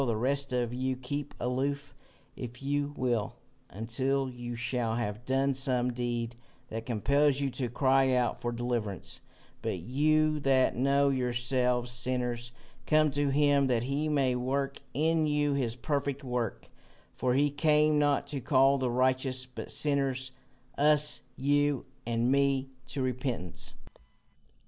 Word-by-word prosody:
The 120 -4 0
rest 140 +4 0
of 120 -1 -1
you 130 +1 -1
keep 140 +3 -5
aloof, 140 +3 -2 0.4
if 125 +1 -8
you 145 +1 0
will, 120 -5 0 0.3
until 130 +5 -1
you 120 -1 -6
shall 120 -1 0
have 115 0 -3
done 135 +1 +1
some 125 -2 0
deed 120 -1 -2 0.3
that 115 +2 -5
compels 140 +5 +2
you 140 -1 -1
to 125 -1 -3
cry 135 +2 +3
out 125 -1 0
for 120 - -1
deliverance; 120 -4 -3 0.4
but - - -2
you 155 +4 +2
that 135 -2 +3
know 140 +2 +3
yourselves 125 -1 0
sinners, 120 -1 -2 0.4
come 155 -1 +4
to 145 0 0
him 140 -1 +3
that 120 -3 +1
he 140 +4 -1
may 135 -4 +2
work 135 +2 -2
in 160 +1 +2
you 150 -1 +1
his 125 -5 -1
perfect 140 +3 -2
work, 125 -3 -3 0.4
for 125 -1 0
he 145 +1 +3
came 150 0 +3
not 145 -1 +2
to 140 -2 -4
call 135 +2 +4
the 130 -1 0
righteous, 130 +1 +1
but 130 0 -8
sinners, 135 -3 0 0.5
us, 150 0 +3
you 145 0 +1 0.2
and 120 +1 +1
me, 135 -1 +2 0.2
to 135 - -3
repentance." 125 -8 -3
130 Hz, 140 wpm, -30 LUFS, 125-140 Hz, 0.5 s, come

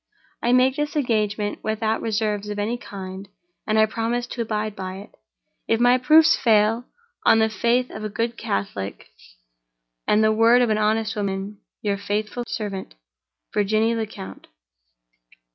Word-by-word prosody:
I 240 - +1
make 255 +1 +4
this 295 0 -2
engagement 215 -6 0
without 220 0 -1
reserves 210 -2 -1
of 205 - -4
any 210 +3 -1
kind; 195 -4 -8 0.4
and 215 0 +2
I 220 - +6
promise 230 +2 -2
to 240 0 -5
abide 215 -2 -2
by 185 -1 -5
it—if - - -6
my 245 +1 +5
proofs 315 +4 +6
fail—on 230 - +1
the 220 0 +3
faith 235 +4 +1
of 215 - -7
a 215 - -3
good 230 +3 -2
Catholic, 100 - -4 1.0
and 210 +1 +4
the 215 - +4
word 230 +3 +5
of 235 - +1
an 215 - +1
honest 220 +1 +1
woman. 200 0 -3 0.2
Your 200 -1 0
faithful 210 +4 -3
servant, 200 - -5 0.6
"VIRGINIE 215 +2 +2
LECOUNT." 210 - -6
215 Hz, 145 wpm, -23 LUFS, 205-235 Hz, 1.0 s, I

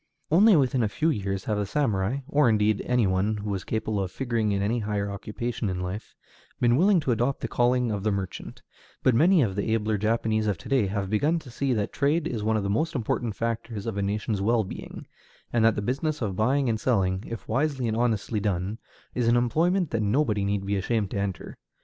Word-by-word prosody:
Only 200 +5 +6
within 130 -4 +2
a 110 - +1
few 160 +9 +1
years 100 -6 -2
have 105 -1 -1
the 105 - 0
samurai, 115 -1 0
or 145 -4 +3
indeed 105 -1 +2
any 125 -3 +3
one 95 +3 +1
who 105 0 -4
was 95 -2 -3
capable 110 -2 -2
of 95 - -2
figuring 115 0 -1
in 100 - 0
any 115 +4 0
higher 105 -2 -2
occupation 110 +2 -4
in 90 -1 -3
life, 90 +4 -5 0.4
been 120 -1 +4
willing 185 +5 +4
to 135 - 0
adopt 120 +4 0
the - - -2
calling 125 -1 +1
of 100 -2 -2
the 105 +1 0
merchant; 95 -2 -5 0.4
but 130 - +4
many 165 +6 +5
of 100 -5 -2
the 100 +2 -1
abler 110 -1 0
Japanese 110 0 0
of 100 -4 0
to - - -11
day 130 -7 +2
have 100 0 -3
begun 150 +10 +2
to 145 -6 -9
see 135 +3 -1
that 105 -3 -2
trade 150 +3 +1
is 115 -7 -3
one 110 +1 +1
of 105 - -1
the - - -1
most 155 +11 0
important 115 -2 -1
factors 115 -2 -3
of 115 -3 -3
a 100 - -1
nation's 105 +1 -1
well 115 +2 +2
being, 95 - -8 0.5
and 120 -2 +3
that 115 -1 +4
the 105 - -2
business 145 +6 -1
of 100 -6 -2
buying 130 +7 +2
and 110 -2 0
selling, 95 -5 +1
if 115 - -7
wisely 135 +1 0
and 110 - -1
honestly 115 -2 0
done, 100 +1 -2 0.3
is 120 -2 0
an 120 +1 +4
employment 165 +8 +1
that 115 - 0
nobody 105 -1 +1
need 100 0 -1
be 100 +1 0
ashamed 100 +1 -1
to - - -3
enter. 100 -2 -4
110 Hz, 225 wpm, -26 LUFS, 100-125 Hz, 0.5 s, Only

